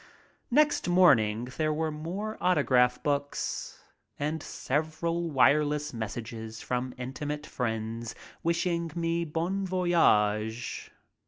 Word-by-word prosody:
Next 295 Hz, -1 st, +3 dB
morning 120 Hz, -11 st, +4 dB
there 155 Hz, -1 st, +1 dB
were 155 Hz, +1 st, -1 dB
more 185 Hz, +8 st, -4 dB
autograph 130 Hz, -8 st, +3 dB
books 145 Hz, -1 st, -2 dB, 0.3 s
and 150 Hz, +2 st, -2 dB
several 160 Hz, +5 st, -2 dB
wireless 150 Hz, +1 st, +3 dB
messages 110 Hz, 0 st, -5 dB
from 125 Hz, 0 st, -3 dB
intimate 145 Hz, +4 st, -4 dB
friends 115 Hz, -2 st, -3 dB, 0.3 s
wishing 170 Hz, 0 st, 0 dB
me 170 Hz, 0 st, 0 dB
bon 170 Hz, +5 st, -1 dB
voyage. 120 Hz, -, +1 dB
150 Hz, 95 wpm, -29 LUFS, 125-170 Hz, 0.3 s, morning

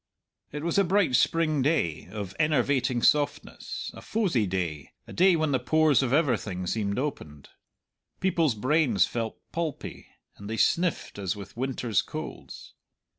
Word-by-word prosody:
It 150 Hz, +1 st, -5 dB
was 170 Hz, +3 st, +1 dB
a -, -, +5 dB
bright 185 Hz, -6 st, +2 dB
spring 155 Hz, -2 st, +2 dB
day, 85 Hz, -, 0 dB
of 100 Hz, -1 st, -6 dB
enervating 130 Hz, -4 st, +1 dB
softness; 145 Hz, -1 st, 0 dB
a -, -, -11 dB
fosie 175 Hz, -, 0 dB
day 85 Hz, -6 st, -3 dB
a -, -, -11 dB
day 185 Hz, 0 st, +5 dB
when 155 Hz, -2 st, 0 dB
the 130 Hz, -, +2 dB
pores 155 Hz, +2 st, +3 dB
of 130 Hz, -3 st, -1 dB
everything 115 Hz, -, 0 dB
seemed 100 Hz, +1 st, -1 dB
opened. 75 Hz, -, -5 dB, 0.7 s
People's 165 Hz, -8 st, +1 dB
brains 125 Hz, -, +2 dB
felt 115 Hz, -2 st, -4 dB
pulpy, 165 Hz, -4 st, -5 dB, 0.3 s
and 100 Hz, +1 st, -9 dB
they 115 Hz, -, -3 dB
sniffed 170 Hz, -, +1 dB
as 95 Hz, 0 st, -2 dB
with 100 Hz, -2 st, -10 dB
winter's 120 Hz, -4 st, 0 dB
colds. -, -, -8 dB
130 Hz, 145 wpm, -27 LUFS, 105-155 Hz, 0.7 s, a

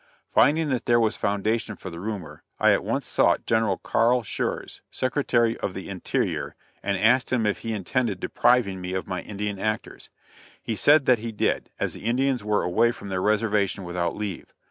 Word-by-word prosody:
Finding 155 Hz, +1 st, +4 dB
that 130 Hz, -3 st, -2 dB
there 120 Hz, 0 st, +5 dB
was 110 Hz, -2 st, +2 dB
foundation 105 Hz, +2 st, -1 dB
for 95 Hz, -, -8 dB
the 85 Hz, -, -8 dB
rumor, 100 Hz, -4 st, -6 dB, 0.2 s
I -, -, +5 dB
at -, -, 0 dB
once -, -, -2 dB
sought -, -, +2 dB
General 110 Hz, -4 st, +1 dB
Carl 120 Hz, +1 st, +2 dB
Shurz, 100 Hz, -, -3 dB
Secretary 120 Hz, -3 st, +1 dB
of 95 Hz, -, -3 dB
the 95 Hz, -, -6 dB
Interior, 95 Hz, -3 st, -2 dB, 0.3 s
and 100 Hz, 0 st, -1 dB
asked 120 Hz, +5 st, +3 dB
him 120 Hz, -4 st, +1 dB
if 105 Hz, -, 0 dB
he 115 Hz, -, -4 dB
intended 105 Hz, 0 st, -1 dB
depriving 110 Hz, -4 st, +2 dB
me 90 Hz, 0 st, -4 dB
of 95 Hz, -, -2 dB
my 90 Hz, -1 st, -4 dB
Indian 105 Hz, -1 st, -4 dB
actors. 110 Hz, +1 st, -3 dB, 0.5 s
He 115 Hz, -, -4 dB
said 145 Hz, +5 st, +5 dB
that 125 Hz, -3 st, +4 dB
he 115 Hz, +1 st, -5 dB
did, 105 Hz, -, -1 dB
as -, -, -1 dB
the -, -, -10 dB
Indians 125 Hz, 0 st, +1 dB
were 105 Hz, 0 st, +1 dB
away 115 Hz, +7 st, +3 dB
from 115 Hz, -4 st, -9 dB
their 95 Hz, -1 st, -1 dB
reservation 105 Hz, -2 st, +1 dB
without 85 Hz, -1 st, -2 dB
leave. 105 Hz, -5 st, -5 dB
110 Hz, 190 wpm, -25 LUFS, 95-120 Hz, 0.5 s, there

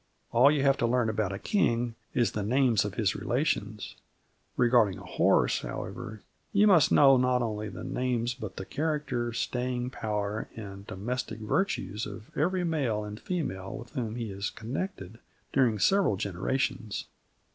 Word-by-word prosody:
All 125 Hz, +4 st, +6 dB
you 145 Hz, -2 st, +2 dB
have 140 Hz, -1 st, +4 dB
to 120 Hz, -, +1 dB
learn 120 Hz, -1 st, +2 dB
about 105 Hz, -3 st, -1 dB
a 95 Hz, -, -3 dB
king 120 Hz, -, +1 dB, 0.2 s
is 120 Hz, -2 st, +3 dB
the 105 Hz, -, -3 dB
names 120 Hz, 0 st, +3 dB
of 100 Hz, -, -4 dB
his 105 Hz, -3 st, +1 dB
relations: 110 Hz, -5 st, -1 dB, 0.6 s
regarding 115 Hz, -6 st, +4 dB
a 100 Hz, -, -10 dB
horse, 90 Hz, -, +3 dB
however, 110 Hz, +2 st, -6 dB, 0.3 s
you 205 Hz, +1 st, +5 dB
must 180 Hz, -9 st, +6 dB
know 135 Hz, -2 st, +7 dB
not 125 Hz, -1 st, +2 dB
only 105 Hz, -2 st, -3 dB
the -, -, -8 dB
names 125 Hz, -1 st, -1 dB
but 110 Hz, -6 st, -7 dB
the 95 Hz, -, -6 dB
character, 145 Hz, -6 st, -1 dB
staying 125 Hz, +1 st, -2 dB
power 105 Hz, -3 st, -3 dB
and 100 Hz, -2 st, -8 dB
domestic 110 Hz, +4 st, -4 dB
virtues 110 Hz, -, -1 dB
of 110 Hz, +1 st, -10 dB
every 180 Hz, +5 st, +1 dB
male 135 Hz, -11 st, 0 dB
and 105 Hz, +1 st, -7 dB
female 95 Hz, -, -3 dB
with 120 Hz, -, -10 dB
whom 115 Hz, -3 st, -3 dB
he 115 Hz, -3 st, -4 dB
is 100 Hz, +2 st, -3 dB
connected 115 Hz, -, -5 dB, 0.3 s
during 125 Hz, -5 st, +3 dB
several 190 Hz, -, +3 dB
generations. 105 Hz, +3 st, -2 dB
115 Hz, 155 wpm, -29 LUFS, 105-130 Hz, 0.6 s, know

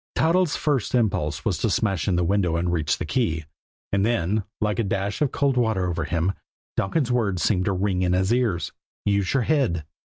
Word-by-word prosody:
Toddles' 170 Hz, 0 st, +2 dB
first 140 Hz, -6 st, 0 dB
impulse 95 Hz, -10 st, 0 dB
was -, -, 0 dB
to -, -, +1 dB
smash 95 Hz, -7 st, 0 dB
in 95 Hz, -, +2 dB
the 90 Hz, -, +2 dB
window 90 Hz, -2 st, +1 dB
and 85 Hz, +1 st, 0 dB
reach 80 Hz, -3 st, 0 dB
the -, -, -4 dB
key. 80 Hz, -, -1 dB, 0.5 s
And 100 Hz, 0 st, +2 dB
then, 105 Hz, -2 st, +1 dB
like 105 Hz, -1 st, 0 dB
a -, -, +2 dB
dash 100 Hz, +2 st, -2 dB
of 145 Hz, -3 st, +2 dB
cold 140 Hz, -2 st, +1 dB
water 110 Hz, -6 st, +1 dB
over 85 Hz, -, -2 dB
him, 85 Hz, +3 st, 0 dB, 0.4 s
Donkin's 125 Hz, +6 st, 0 dB
words 100 Hz, -8 st, 0 dB
seemed 95 Hz, -4 st, +2 dB
to 100 Hz, -, +1 dB
ring 95 Hz, -1 st, 0 dB
in 90 Hz, -1 st, +2 dB
his 95 Hz, +4 st, +2 dB
ears: 115 Hz, -9 st, 0 dB, 0.3 s
"Use 100 Hz, -1 st, +1 dB
your 130 Hz, -, +3 dB
head." 120 Hz, -, +1 dB
100 Hz, 200 wpm, -24 LUFS, 90-120 Hz, 0.5 s, your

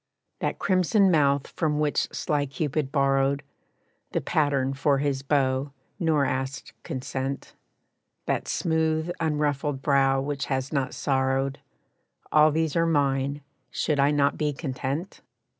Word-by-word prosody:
That -, -, -2 dB
crimson 190 Hz, +1 st, +3 dB
mouth 140 Hz, -3 st, +3 dB
from 155 Hz, -3 st, -1 dB
which 150 Hz, -1 st, 0 dB
sly 145 Hz, -1 st, -1 dB
Cupid 140 Hz, +1 st, -2 dB
borrowed 140 Hz, 0 st, +2 dB, 0.7 s
The -, -, 0 dB
pattern 140 Hz, -3 st, +1 dB
for 140 Hz, +1 st, +2 dB
his 140 Hz, -1 st, -1 dB
bow, 135 Hz, 0 st, 0 dB, 0.3 s
nor 160 Hz, -5 st, +2 dB
asked 130 Hz, -2 st, -3 dB
consent; 130 Hz, +2 st, -4 dB, 0.7 s
That -, -, -1 dB
smooth, 160 Hz, 0 st, 0 dB
unruffled 150 Hz, -3 st, -1 dB
brow 135 Hz, -2 st, +3 dB
which 140 Hz, 0 st, -2 dB
has 135 Hz, 0 st, -2 dB
not 135 Hz, -2 st, -1 dB
sorrowed 135 Hz, 0 st, 0 dB, 0.7 s
All 155 Hz, 0 st, +6 dB
these 160 Hz, -1 st, 0 dB
are 165 Hz, 0 st, +3 dB
mine; 140 Hz, -2 st, +1 dB, 0.3 s
should 150 Hz, +2 st, -1 dB
I 140 Hz, +1 st, +5 dB
not 145 Hz, -1 st, +2 dB
be 150 Hz, -1 st, 0 dB
content? 140 Hz, +4 st, -4 dB
140 Hz, 125 wpm, -26 LUFS, 135-150 Hz, 0.7 s, All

